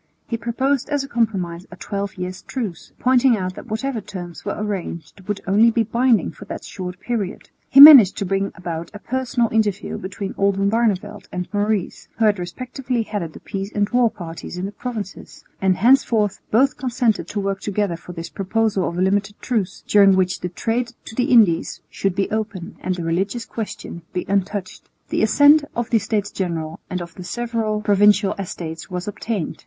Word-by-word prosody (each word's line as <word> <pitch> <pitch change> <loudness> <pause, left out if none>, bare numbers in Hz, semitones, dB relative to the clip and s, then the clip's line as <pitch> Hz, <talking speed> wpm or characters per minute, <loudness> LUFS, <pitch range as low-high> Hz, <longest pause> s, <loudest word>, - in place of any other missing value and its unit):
He 235 - -2
proposed 260 +4 -1
as 290 -2 0
a - - -7
compromise 195 -9 -1
a 180 - -10
twelve 200 +1 -4
years' 185 0 -5
truce, 215 -11 -5
pointing 250 -1 +4
out 185 -1 -3
that - - -10
whatever 230 +2 -2
terms 175 -4 -8
were 205 - -3
arranged 195 -4 -5
would 205 -1 -2
only 210 +5 +5
be 230 0 +2
binding 235 0 +2
for 205 - -12
that - - -7
short 180 -1 -7
period. 215 -3 -4 0.2
He 275 - +5
managed 280 -9 +11
to 200 - -2
bring 195 +1 -1
about 170 -2 -5
a - - -4
personal 250 0 -1
interview 210 -3 0
between 195 +1 -5
Oldenbarneveldt 200 0 +1
and 180 0 -4
Maurice, 205 -2 -1
who 225 - +2
had 205 -2 +3
respectively 250 +6 -3
headed 200 -7 -4
the - - -11
peace 195 +1 -5
and 205 -1 +2
war 245 -1 +4
parties 170 -2 -8
in 180 - -3
the 200 - -4
provinces; 215 -3 -7 0.2
and 190 -1 +2
henceforth 220 -3 +3
both 265 +5 +3
consented 245 -3 0
to 205 - -3
work 195 -1 -2
together 205 -3 -1
for 175 +1 -10
this 165 -1 -6
proposal 200 0 0
of 170 - -6
a - - 0
limited 200 +2 0
truce, 220 -7 -2
during 200 -2 +6
which 185 0 +1
the 180 - -4
trade 235 +6 -2
to - - -9
the 245 +2 +1
Indies 220 - +3
should 195 -2 -1
be 195 - 0
open 215 -5 -4
and 185 - -2
the 175 - -5
religious 190 +8 -1
question 215 -5 -6
be 180 - -2
untouched. 195 0 -2 0.2
The - - 0
assent 285 +7 +6
of 240 0 -3
the 230 - +4
States 205 0 -2
General 165 -4 -3
and 180 -1 -3
of 170 -1 -12
the 180 - -9
several 225 0 -2
Provincial 205 -1 +4
Estates 165 -3 -6
was 180 0 -4
obtained. 210 -3 -3
205 Hz, 185 wpm, -21 LUFS, 185-230 Hz, 0.2 s, managed